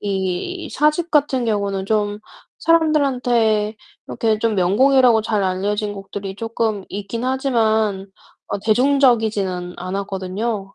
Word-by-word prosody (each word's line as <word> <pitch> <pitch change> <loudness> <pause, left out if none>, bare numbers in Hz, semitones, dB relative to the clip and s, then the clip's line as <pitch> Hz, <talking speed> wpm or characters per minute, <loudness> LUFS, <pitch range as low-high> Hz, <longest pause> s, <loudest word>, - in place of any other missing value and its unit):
이 200 - -3
4 300 +1 +3
집 340 +2 -4
같은 280 -4 +2
경우는 200 -3 -1
좀 210 -1 0 0.4
사람들한테 250 -10 +2 0.3
이렇게 220 -2 0
좀 225 -1 0
명곡이라고 230 +5 +4
잘 215 -2 0
알려진 205 +3 -1
곡들이 195 -1 -7
쪼끔 225 -3 -2
있긴 205 +4 -5
하지만 220 -7 +1 0.4
어 200 - -2
대중적이지는 220 -7 +2
않았거든요. 195 +2 -4
215 Hz, 270 characters per minute, -20 LUFS, 195-250 Hz, 0.4 s, 명곡이라고